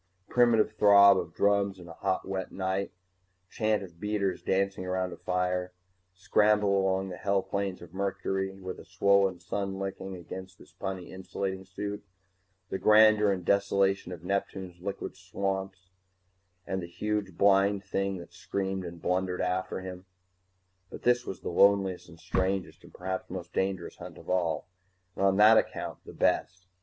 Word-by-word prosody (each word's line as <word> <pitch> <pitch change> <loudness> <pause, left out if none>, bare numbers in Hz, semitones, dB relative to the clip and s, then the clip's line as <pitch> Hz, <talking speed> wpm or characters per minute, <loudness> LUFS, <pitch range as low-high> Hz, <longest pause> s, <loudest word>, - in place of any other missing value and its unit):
Primitive 120 -3 +4
throb 100 -2 +7
of 85 -2 -6
drums 100 -1 +2
in 90 -1 -12
a 85 - -9
hot 95 - -2
wet 95 -1 -3
night, 95 +1 -2 0.6
chant 110 -2 +1
of 85 -3 -12
beaters 105 -2 -1
dancing 95 0 0
around 90 0 -2
a - - -7
fire 90 0 -1 0.4
scramble 105 +2 +3
along 95 0 +1
the 90 - -6
hell 100 -1 +1
plains 95 -1 -3
of 85 -1 -13
Mercury 95 0 -2
with 95 -1 -6
a - - -10
swollen 100 -2 +2
sun 95 +2 -3
licking 95 -1 -5
against 95 +1 -9
his - - -17
puny 95 -2 -5
insulating 95 0 -4
suit 100 +2 -5 0.7
the 95 - -2
grandeur 105 -1 +6
and 90 -2 -3
desolation 100 -1 +2
of 85 -2 -8
Neptune's 95 -2 -3
liquid 100 +1 -4
gas 95 - -21
swamps 95 -1 -4 0.7
and 95 0 -2
the 85 - -6
huge 100 0 -3
blind 100 0 +4
thing 100 -1 -1
that 85 - -11
screamed 95 -1 -3
and 85 -1 -8
blundered 90 0 0
after 95 +1 -1
him 95 0 -8 0.8
But - - -10
this 120 0 +3
was 95 - -6
the - - -4
loneliest 95 0 +3
and 85 -1 -14
strangest 95 +1 -1
and - - -15
perhaps 95 +1 -4
most 90 -1 -7
dangerous 95 -2 -2
hunt - - -10
of - - -7
all, 85 -3 0 0.5
and - - -2
on 95 0 +4
that 110 +2 +8
account - - -4
the - - -9
best. 95 +1 0
95 Hz, 165 wpm, -29 LUFS, 90-100 Hz, 0.8 s, that